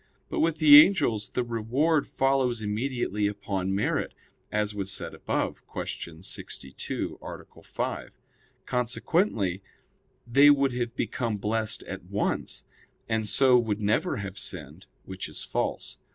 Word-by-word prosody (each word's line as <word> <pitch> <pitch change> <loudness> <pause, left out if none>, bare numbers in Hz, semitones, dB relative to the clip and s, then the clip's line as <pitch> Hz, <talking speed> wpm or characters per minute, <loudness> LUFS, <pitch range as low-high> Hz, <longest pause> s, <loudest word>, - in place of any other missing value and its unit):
But - - -2
with 160 -1 +2
the 150 -1 +10
angels 145 - 0
the 125 - -1
reward 125 +7 +1
follows 130 -4 +1
immediately 105 -1 -1
upon 100 -2 -2
merit; 100 - -1 0.4
as 105 0 0
was 100 -2 -4
said - - -4
above - - -2
(Q. 80 +1 -6
62, 65 -7 -5
A. - - -10
5). - - -4 0.5
Consequently 125 - 0 0.6
they 140 +5 +6
would 140 -2 +4
have 120 -1 -3
become 115 -6 -2
blessed 110 +1 -1
at 95 -2 -7
once; 100 +3 -2 0.4
and 110 -1 0
so 125 +4 +5
would 110 -3 -1
never 105 +1 +1
have 100 -1 -5
sinned, 80 0 -6 0.2
which 95 -1 -6
is - - -5
false. - - -3
110 Hz, 130 wpm, -27 LUFS, 100-130 Hz, 0.6 s, the